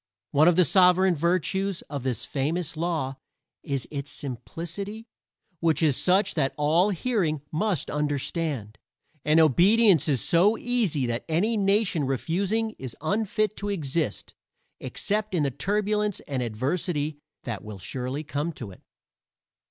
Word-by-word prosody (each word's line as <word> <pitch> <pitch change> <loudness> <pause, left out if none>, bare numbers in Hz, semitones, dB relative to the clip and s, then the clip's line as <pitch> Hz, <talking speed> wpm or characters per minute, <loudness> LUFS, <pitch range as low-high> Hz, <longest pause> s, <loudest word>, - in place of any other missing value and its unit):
One 150 +3 +5
of 175 - +5
the 180 0 +5
sovereign 185 +2 +5
virtues 180 +3 0
of 145 -2 -6
this 125 -4 -2
famous 160 +4 -2
law 155 -5 -2 0.4
is 135 -3 -3
its 140 -1 -4
simplicity, 175 - -6 0.5
which 165 -1 +1
is 150 -4 +4
such 190 +6 +3
that 140 -4 0
all 160 +6 +3
hearing 180 - -1
must 180 0 -1
understand; 145 - -2 0.4
and 155 +2 +4
obedience 180 - +5
is 135 -6 +1
so 195 +7 +4
easy 215 - 0
that 120 0 -2
any 195 +9 +1
nation 195 -6 +2
refusing 195 - -1
is 130 -3 -7
unfit 215 +5 0
to 205 - -3
exist 155 - -2 0.5
except 210 -1 -2
in 160 - +2
the 140 - 0
turbulence 210 - 0
and 135 -3 -3
adversity 145 - -2 0.2
that 115 -5 -5
will 105 -1 -8
surely 130 +9 -4
come 155 +2 -3
to 115 -8 -8
it. 90 - -15
165 Hz, 135 wpm, -26 LUFS, 140-195 Hz, 0.5 s, One